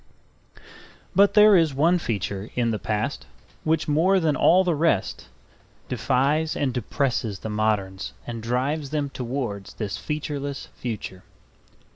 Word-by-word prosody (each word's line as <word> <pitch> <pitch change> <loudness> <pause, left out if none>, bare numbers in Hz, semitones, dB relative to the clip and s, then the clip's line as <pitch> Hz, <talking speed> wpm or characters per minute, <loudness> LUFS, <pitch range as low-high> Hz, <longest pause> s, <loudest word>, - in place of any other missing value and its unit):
But 200 +3 +4
there 210 -1 +8
is 160 -6 +3
one 170 +6 +3
feature 100 - -3
in 120 -2 +1
the 110 - -2
past 105 -1 -2 0.4
which 160 0 +1
more 170 +6 +3
than 155 -4 +1
all 185 +3 +5
the 180 -2 +1
rest 155 - 0 0.6
defies 145 +5 +1
and 135 -3 -1
depresses 120 -3 -1
the 110 - -6
moderns 105 -3 -1
and 115 -1 -5
drives 135 +6 -1
them 145 -2 -2
towards 120 -6 -4
this 105 -3 -4
featureless 145 -2 -4
future. 105 -6 -6
135 Hz, 130 wpm, -24 LUFS, 110-155 Hz, 0.6 s, there